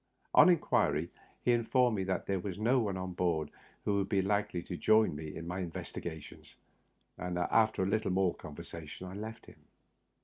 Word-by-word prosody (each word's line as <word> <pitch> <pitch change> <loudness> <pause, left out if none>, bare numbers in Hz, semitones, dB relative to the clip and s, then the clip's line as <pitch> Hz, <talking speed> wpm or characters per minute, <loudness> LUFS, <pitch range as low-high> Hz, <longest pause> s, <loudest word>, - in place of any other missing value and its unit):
On - - +8
inquiry, 85 - +2 0.3
he 125 - +3
informed 120 0 +3
me 95 - -1
that 95 0 -1
there 95 -1 0
was 90 0 -5
no 120 +5 +3
one 100 -5 -1
on 95 0 -4
board 80 -4 0 0.3
who 100 -1 +2
would 95 0 -1
be 100 -2 +2
likely 95 -3 0
to 90 - -5
join 110 -1 +4
me 75 +1 -6
in 85 - -6
my 90 +2 -3
investigations, 85 -2 -7 0.6
and 90 -1 -3
after 110 +3 +2
a - - 0
little 110 +2 0
more 95 -1 +2
conversation 80 +2 -9
I 90 - -7
left 110 +3 -7
him. - - -16
95 Hz, 180 wpm, -32 LUFS, 85-110 Hz, 0.6 s, On